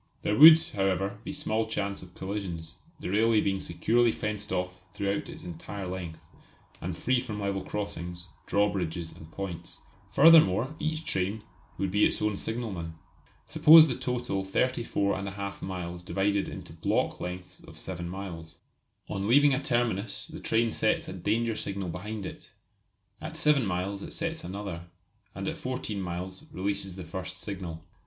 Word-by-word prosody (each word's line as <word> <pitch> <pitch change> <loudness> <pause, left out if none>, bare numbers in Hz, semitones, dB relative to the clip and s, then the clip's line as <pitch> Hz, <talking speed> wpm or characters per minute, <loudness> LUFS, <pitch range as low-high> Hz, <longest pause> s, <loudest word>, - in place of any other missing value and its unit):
There 105 - +1
would, 155 +5 +11
however, 95 0 0
be 150 - -5
small 115 -7 -1
chance 100 -2 -2
of 90 -1 -13
collisions, 90 -5 -5 0.2
the - - -4
railway 110 +2 +4
being 95 -2 +1
securely 115 +8 +2
fenced 105 -1 -4
off 90 0 -2
throughout 100 0 -1
its - - -9
entire 90 +3 -6
length, 90 -3 -5 0.6
and 85 0 -4
free 130 +5 +2
from 110 -4 -5
level 100 -1 -1
crossings, 90 -3 -5 0.2
drawbridges 90 -5 0
and 80 - -13
points. 90 -3 -6 0.3
Furthermore, 140 - +6
each 155 +1 -2
train 100 +1 -1 0.3
would 95 -1 -1
be 105 +2 +3
its - - +3
own 105 -1 +1
signalman. 100 -8 -4 0.5
Suppose 160 +1 +8
the 130 - 0
total 125 -6 -2
34 100 -2 0
1/2 100 0 -5
miles 90 -2 -5
divided 100 +2 0
into - - -8
"block" - - 0
lengths 90 0 -6
of 80 - -14
7 85 +1 -4
miles. 85 -4 -7 0.5
On 100 +1 -2
leaving 145 +4 +6
a 130 - 0
terminus 120 -6 0
the - - -9
train 115 0 +2
sets - - +1
a - - -5
danger 110 +5 0
signal 100 -3 -3
behind 105 +4 -5
it; - - -8 0.7
at - - -6
7 150 -3 +4
miles 95 +1 -2
it - - -6
sets 165 -1 -3
another, 90 -3 -5 0.5
and 95 0 -4
at - - -2
14 125 -6 -3
miles 90 +1 -5
releases 95 0 -2
the 95 - -6
first 95 +3 -6
signal. 90 -5 -6
100 Hz, 155 wpm, -29 LUFS, 90-110 Hz, 0.7 s, would